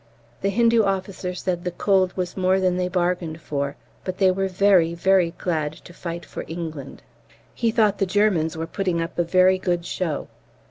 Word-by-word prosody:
The 195 - +1
Hindu 230 +2 +4
officer 190 -2 -2
said 175 -1 -2
the 180 - -1
cold 185 +1 +1
was 180 -1 -2
more 185 0 +2
than 185 -1 +2
they 180 0 0
bargained 175 -3 -1
for, 140 -3 -3 0.3
but 185 0 -4
they 190 -2 +4
were 195 +1 0
"very, 185 -3 +3
very 185 0 +3
glad 155 -4 -1
to 175 - -14
fight 170 -1 -6
for - - -7
England." 160 -5 -7 0.5
He 235 - 0
thought 215 -3 +2
the 195 - +1
Germans 180 -5 +1
were 160 - -2
putting 180 0 -1
up 165 +1 -4
a - - +4
very 185 +2 +4
good 175 -2 -1
show. 165 -6 -3
180 Hz, 185 wpm, -23 LUFS, 170-195 Hz, 0.5 s, Hindu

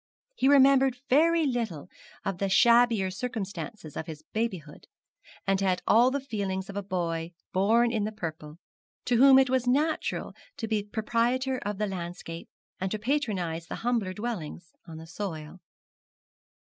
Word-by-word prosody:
He 270 - +1
remembered 270 -2 +5
very 325 +3 +4
little 230 - -2 0.4
of 195 -3 -2
the 195 - 0
shabbier 230 -1 +4
circumstances 205 - -6
of 160 - -5
his 155 -2 -8
babyhood, 185 -10 -4 0.6
and 195 0 +1
had 185 -2 0
all 235 +4 +5
the 280 +2 -1
feelings 200 -6 -4
of - - -12
a 205 - -2
boy 170 -3 -3 0.2
born 225 +5 +3
in 220 -3 0
the 215 - -2
purple, 155 -6 -7 0.5
to 245 - +2
whom 265 +2 +8
it 265 -1 +4
was 255 -1 +1
natural 300 +5 0 0.2
to 225 - -4
be 215 -1 0
proprietor 240 +5 -1
of 205 -1 -4
the 210 - 0
landscape, 175 -3 -6 0.3
and 190 - -1
to 215 - -2
patronise 200 - -2
the - - -5
humbler 230 -6 0
dwellers 190 -7 -6
on 160 -1 -9
the 160 - -9
soil. 165 -2 -6
210 Hz, 155 wpm, -28 LUFS, 180-245 Hz, 0.6 s, whom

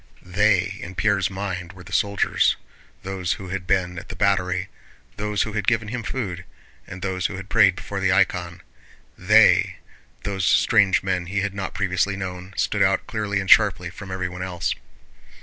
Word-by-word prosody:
They, 95 0 +1
in 95 +2 -8
Pierre's 95 -1 +1
mind, 95 -2 -5
were 90 -1 -13
the 95 +2 -12
soldiers, 100 0 +2 0.5
those 95 -1 -2
who 95 0 -8
had 95 -1 -4
been 90 -2 0
at - - -14
the - - -6
battery, 95 -2 +1 0.5
those 105 0 -1
who 110 - -6
had 105 -2 -3
given 115 -2 +1
him 125 +1 -3
food, 100 -6 -4 0.4
and 95 - -9
those 95 -2 -1
who 100 - -7
had 95 +1 -8
prayed 95 -2 +5
before 100 +1 -5
the 95 -1 +2
icon. 90 -2 +1 0.5
They, - - +5 0.5
those 95 -2 -3
strange 95 0 +4
men 90 -2 -1
he 100 +1 -1
had 100 -1 -2
not 100 -1 -5
previously 100 0 0
known, 90 -1 -7
stood - - 0
out - - +3
clearly 105 -2 -2
and 95 - -4
sharply 90 -5 +5
from 95 +1 -10
everyone 90 -1 -4
else. 90 -2 -2
95 Hz, 175 wpm, -23 LUFS, 90-100 Hz, 0.5 s, prayed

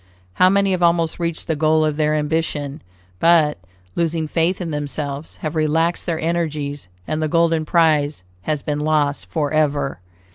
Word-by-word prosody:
How 185 - +5
many 200 0 +2
have 185 -1 0
almost 170 -1 +2
reached 170 -1 -2
the 160 - -1
goal 155 +1 +3
of 155 -1 0
their 155 0 +1
ambition, 150 -2 -2 0.4
but, 160 - +4 0.4
losing 165 -2 0
faith 165 +4 0
in 170 -3 -4
themselves, 145 0 -4
have 155 - -2
relaxed 160 +2 +1
their 165 -2 -1
energies, 155 - -2 0.2
and 155 0 -2
the 155 - +1
golden 165 0 +2
prize 150 - +2 0.2
has 150 +7 -2
been 150 -1 -2
lost 150 -1 0
forever. 145 - 0
155 Hz, 155 wpm, -20 LUFS, 150-165 Hz, 0.4 s, How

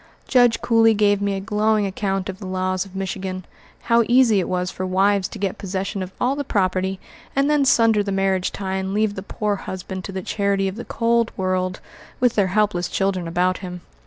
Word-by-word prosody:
Judge 245 -3 +4
Cooley 225 -1 +4
gave 205 -1 +3
me 200 -1 0
a - - -2
glowing 210 +1 +1
account 195 0 -2
of 190 -1 -6
the 190 - -7
laws 185 0 -1
of 195 -1 -14
Michigan 185 -1 -4 0.4
how 235 0 +4
easy 240 -4 +5
it 180 - -2
was 180 0 -1
for 185 - -5
wives 190 +1 +2
to - - -9
get 195 -2 -3
possession 195 +1 -3
of 185 0 -5
all 255 +3 +1
the 285 - -2
property, 190 -4 0 0.4
and 275 +2 +2
then 295 -2 +3
sunder 225 -5 +4
the 200 -1 -3
marriage 195 -1 +1
tie 190 -1 -3
and 190 +1 -3
leave 215 -1 +1
the 190 - -6
poor 205 +1 -2
husband 190 0 -6
to 195 - -6
the 190 -1 -5
charity 200 -1 0
of 190 - -4
the 235 - -7
cold 235 0 +1
world, 185 -1 -1 0.4
with 245 -2 +3
their 200 -3 +2
helpless 190 -2 +1
children 190 -3 -1
about 180 +2 +1
him. 180 -2 -7
195 Hz, 210 wpm, -22 LUFS, 185-215 Hz, 0.4 s, easy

